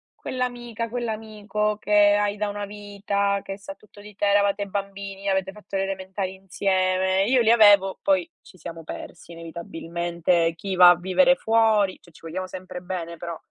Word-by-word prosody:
quell'amica, 240 Hz, -2 st, -4 dB
quell'amico 215 Hz, -3 st, -3 dB
che 210 Hz, -, -7 dB, 0.2 s
hai 205 Hz, 0 st, 0 dB
da 210 Hz, 0 st, -1 dB
una 205 Hz, 0 st, -4 dB
vita, 200 Hz, -1 st, -2 dB
che 195 Hz, 0 st, -6 dB
sa 215 Hz, +9 st, -9 dB
tutto 210 Hz, -4 st, -20 dB
di 210 Hz, -1 st, -13 dB
te, 205 Hz, -, 0 dB
eravate 200 Hz, 0 st, +2 dB
bambini, 195 Hz, 0 st, -5 dB
avete 190 Hz, 0 st, 0 dB
fatto 210 Hz, -1 st, -10 dB
le 195 Hz, -, +1 dB
elementari 190 Hz, 0 st, -4 dB
insieme”. 190 Hz, 0 st, 0 dB
Io 250 Hz, +3 st, +3 dB
li 225 Hz, -, +3 dB
avevo, 205 Hz, -4 st, +6 dB
poi 295 Hz, +3 st, +1 dB
ci 185 Hz, -, -17 dB
siamo 165 Hz, 0 st, -8 dB
persi 170 Hz, +2 st, -9 dB
inevitabilmente. 170 Hz, 0 st, -2 dB
Chi 190 Hz, +3 st, -4 dB
va 180 Hz, -1 st, +9 dB
a 175 Hz, -, +4 dB
vivere 225 Hz, +10 st, +3 dB
fuori 220 Hz, -5 st, +2 dB
cioè 170 Hz, -, -19 dB
ci -, -, -19 dB
vogliamo 185 Hz, +3 st, -4 dB
sempre 185 Hz, -1 st, -8 dB
bene 170 Hz, -2 st, -5 dB
però, 170 Hz, -1 st, -6 dB
200 Hz, 170 wpm, -24 LUFS, 185-210 Hz, 0.2 s, va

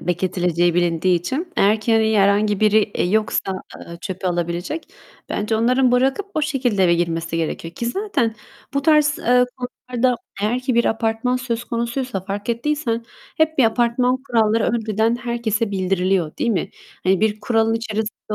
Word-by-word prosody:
bekletileceği 175 Hz, -1 st, 0 dB
bilindiği 175 Hz, +1 st, +2 dB
için. 285 Hz, -, -4 dB
Eğer 210 Hz, +2 st, +3 dB
ki 225 Hz, +2 st, 0 dB
hani 220 Hz, -1 st, +3 dB
herhangi 200 Hz, +1 st, +3 dB
biri, 215 Hz, 0 st, +5 dB
eee, 205 Hz, -, -2 dB
yoksa, 215 Hz, -2 st, 0 dB, 0.2 s
ııı, 170 Hz, -, -10 dB
çöpü 190 Hz, -1 st, -5 dB
alabilecek, 175 Hz, -, -3 dB, 0.4 s
bence 215 Hz, +1 st, -1 dB
onların 250 Hz, +2 st, +3 dB
bırakıp 265 Hz, +10 st, +2 dB
o 310 Hz, -, 0 dB
şekilde 245 Hz, -10 st, +1 dB
eve 170 Hz, -, +4 dB
girmesi 165 Hz, -1 st, -1 dB
gerekiyor 165 Hz, +1 st, -3 dB
ki 235 Hz, -, -4 dB
zaten 245 Hz, -, -1 dB, 0.4 s
bu 280 Hz, -, +1 dB
tarz, 300 Hz, +1 st, +3 dB
eee, 250 Hz, -4 st, +4 dB
konularda 250 Hz, 0 st, -1 dB, 0.3 s
eğer 220 Hz, +5 st, 0 dB
ki 255 Hz, 0 st, -1 dB
bir 235 Hz, +1 st, +3 dB
apartman 225 Hz, +3 st, 0 dB
söz 240 Hz, -2 st, -3 dB
konusuysa 235 Hz, -2 st, -3 dB
fark 200 Hz, +2 st, -5 dB
ettiysen 235 Hz, -1 st, -1 dB, 0.3 s
hep 315 Hz, -1 st, +1 dB
bir 260 Hz, -, +6 dB
apartman 240 Hz, +2 st, +2 dB
kuralları 225 Hz, -2 st, +2 dB
önceden 225 Hz, 0 st, +1 dB
herkese 235 Hz, -3 st, -2 dB
bildiriliyor, 185 Hz, -3 st, 0 dB
değil 235 Hz, -, 0 dB
mi? 185 Hz, -7 st, -1 dB, 0.3 s
Hani 190 Hz, +1 st, +3 dB
bir 215 Hz, -1 st, +1 dB
kuralın 225 Hz, -1 st, +1 dB
içerisinde 220 Hz, -1 st, -4 dB
225 Hz, 155 wpm, -21 LUFS, 195-250 Hz, 0.4 s, bir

